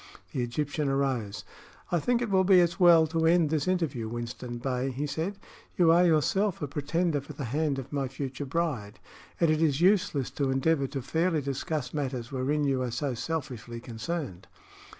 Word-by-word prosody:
The 130 - -2
Egyptian 145 +4 -1
arose. 125 -9 -1 0.5
"I 175 - +2
think 245 +7 +1
it 225 - -3
will 190 -1 +4
be 185 -1 +6
as 170 -1 +2
well 170 -3 +7
to 160 +1 +1
end 165 -2 +4
this 155 -1 0
interview, 155 -12 -1
Winston 120 +1 -5
Bey," 125 +1 -1
he 135 +3 -3
said. 160 +8 -3 0.4
"You 170 -2 +5
are 175 +2 +5
yourself 180 +4 +2
a 150 - -3
pretender 150 +2 -1
for 140 +2 -10
the 140 - -6
hand 145 +3 0
of 135 +1 -7
my 140 -2 0
future 135 +1 -5
bride, 130 -9 -2 0.4
and 165 -2 +4
it 155 0 +1
is 150 -3 +2
useless 175 - +2
to 140 -2 -1
endeavor 135 +2 +1
to 135 -1 -5
fairly 165 +1 0
discuss 140 0 -3
matters 130 -5 -3
wherein 140 +3 0
you 135 -2 +1
are 125 - -1
so 130 +3 -2
selfishly 120 -4 -4
concerned." 115 - -5
145 Hz, 185 wpm, -28 LUFS, 130-165 Hz, 0.5 s, well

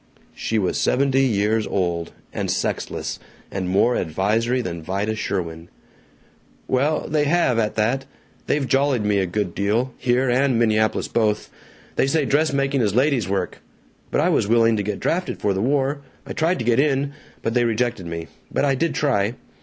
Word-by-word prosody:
She 115 - -2
was 95 -4 0
seventy 135 0 +2
years 110 -3 +1
old, 85 -3 -1 0.2
and - - -2
sexless, - - -2 0.3
and 95 -2 -3
more 100 +6 +3
advisory 110 +9 0
than 85 -9 -4
Vida 100 +6 -2
Sherwin. 85 -6 -4 1.0
"Well, 140 +4 +1
they 150 0 +1
have, 145 -7 +2
at 105 -2 0
that. 125 +5 0 0.4
They've 145 -3 +1
jollied 135 -4 +2
me 105 -1 +2
a 95 - 0
good 90 -1 -2
deal, 110 +6 0
here 125 +1 +2
and 130 0 +2
Minneapolis 110 -1 +2
both. 105 -2 0 0.5
They - - +3
say 150 +1 +1
dressmaking 140 -2 +1
is 105 -3 +1
ladies' 130 -6 +2
work. 95 -2 -2 0.5
(But - - +1
I - - +3
was - - +2
willing 115 0 +4
to - - 0
get 100 0 -3
drafted 180 +2 -1
for 100 - +1
the 95 - -1
war! 140 +3 +1 0.2
I - - -6
tried 165 +3 +1
to 115 - -4
get 120 0 +3
in. 140 0 +1 0.3
But 115 - 0
they 120 0 +3
rejected 115 -4 -1
me. 85 0 -5 0.3
But - - +1
I 140 - +3
did 160 +5 0
try! 120 -6 +1
115 Hz, 175 wpm, -22 LUFS, 100-135 Hz, 1.0 s, willing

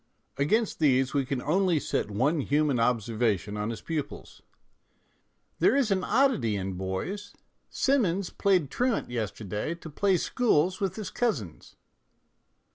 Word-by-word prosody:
Against 210 +11 +1
these 135 -4 +3
we 140 -3 0
can 130 -2 -2
only 175 +1 +2
set 105 - -2
one 135 +10 +1
human 145 -2 +1
observation 110 -4 0
on 105 +1 -2
his 115 - -5
pupils: 160 -3 -5 0.5
" - - -43
There - - +4
is 265 -7 +2
an 190 -1 +1
oddity 245 - +2
in 95 -1 -3
boys: 120 - -4 0.4
Simmons 200 -9 +1
played 185 -8 +1
truant 245 - 0
yesterday 110 - -3
to 165 -2 -11
play 195 +4 +2
schools 185 - +1
with 190 -2 -1
his 215 -3 -6
cousins." 135 - -3
150 Hz, 135 wpm, -28 LUFS, -, 0.5 s, There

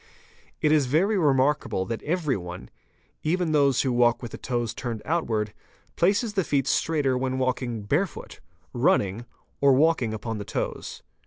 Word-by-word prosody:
It 150 - +4
is 150 -4 +3
very 180 +11 +2
remarkable 140 - +2
that 115 +1 -4
everyone, 135 - -3 0.5
even 170 +1 0
those 140 -4 +3
who 130 -2 0
walk 120 0 +3
with 120 - -6
the - - -7
toes 120 -3 -2
turned 115 -4 -5
outwards, 115 -10 -1 0.4
places 205 +5 +2
the 195 -3 +1
feet 140 -4 0
straighter 145 -4 +1
when 130 0 -1
walking 125 -4 -1
barefoot, 150 - -2 0.3
running, 105 +5 +1 0.3
or 140 -1 +5
walking 140 -4 +3
upon 110 0 -4
the - - -4
toes. - - -5
130 Hz, 150 wpm, -25 LUFS, 115-155 Hz, 0.5 s, or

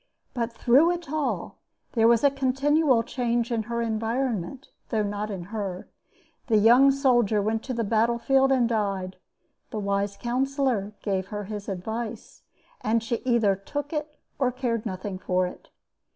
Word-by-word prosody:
But 235 -2 -2
through 255 +8 +4
it 345 -4 -3
all 310 -2 -2 0.3
there 225 -2 +3
was 235 +1 +4
a 285 - +5
continual 275 -1 +2
change 240 -1 -1
in 230 -1 +1
her 235 0 -1
environment, 230 +1 -2 0.2
though 220 -3 +1
not 205 +1 -3
in 190 -4 -5
her. 195 -4 -4 0.6
The 225 -4 +4
young 240 +6 +6
soldier 245 -6 +3
went 220 +2 0
to 260 - -3
the 230 - 0
battle 230 +2 +2
field 270 +3 +3
and 250 -3 +3
died; 195 -5 -2 0.5
the 220 - -5
wise 200 0 -1
counselor 255 -4 -1
gave 190 -2 -1
her 210 0 -5
his 205 0 -6
advice, 220 +4 -5 0.4
and 225 +1 +1
she 235 +1 -1
either 230 -6 +3
took 290 - -5
it 300 0 -4 0.2
or 255 -2 +2
cared 240 -3 -2
nothing 185 0 -5
for 185 0 +1
it. 180 - -9
230 Hz, 160 wpm, -26 LUFS, 205-260 Hz, 0.6 s, young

